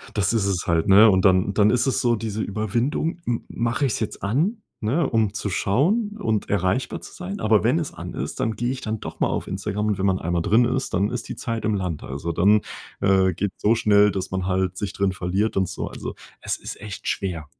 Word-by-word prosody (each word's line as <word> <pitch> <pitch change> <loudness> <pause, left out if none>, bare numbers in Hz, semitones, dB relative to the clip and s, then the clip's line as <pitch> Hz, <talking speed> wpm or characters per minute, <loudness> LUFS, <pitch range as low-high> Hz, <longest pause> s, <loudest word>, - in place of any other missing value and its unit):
Das 105 +2 +1
ist 110 -4 +1
es 95 -3 -1
halt, 80 -1 +2
ne? 105 +3 +8
Und 95 -1 +3
dann 95 +1 +4
dann 105 0 +4
ist 125 +3 +2
es 135 - +1
so 120 -1 +3
diese 110 0 -3
Überwindung, 115 - -1
m 120 -1 -1
mach 115 +4 -2
ich's 135 -5 +1
jetzt 110 - -4
an, 155 - +1 0.2
ne? 135 +8 +1
Um 110 -3 +1
zu 105 -1 -3
schauen 200 - +1
und 110 - -1
erreichbar 100 +5 0
zu - - -11
sein? 195 +3 -6
Aber 110 -1 +3
wenn 130 +9 +3
es 155 - -4
an - - -7
ist, - - -5
dann 110 -1 0
geh 120 +4 -1
ich 130 0 -5
dann 110 0 -3
doch - - -8
mal - - +3
auf - - -3
Instagram 105 +2 -2
und 105 - 0
wenn 95 - 0
man 95 -1 +2
einmal 85 +1 -1
drin 115 +7 +4
ist, 130 +2 -2
dann 100 +4 +2
ist 120 -1 -5
die - - -4
Zeit 115 -2 -4
im 110 - +1
Land. 90 -6 -3
Also, 70 +6 -4
dann, 100 +6 +4 0.4
äh, 95 -1 +3
geht's 100 +3 -4
so 110 +3 +4
schnell, 105 -2 +4
dass 95 -1 -4
man 95 -1 -2
halt 95 -1 0
sich 100 0 -3
drin 100 -1 +1
verliert 95 +5 -1
und 95 -2 +1
so. 95 - -4
Also, - - -6 0.3
es - - -2
ist - - -8
echt 105 -3 -7
schwer. 85 -6 -2
105 Hz, 240 wpm, -23 LUFS, 95-120 Hz, 0.4 s, ne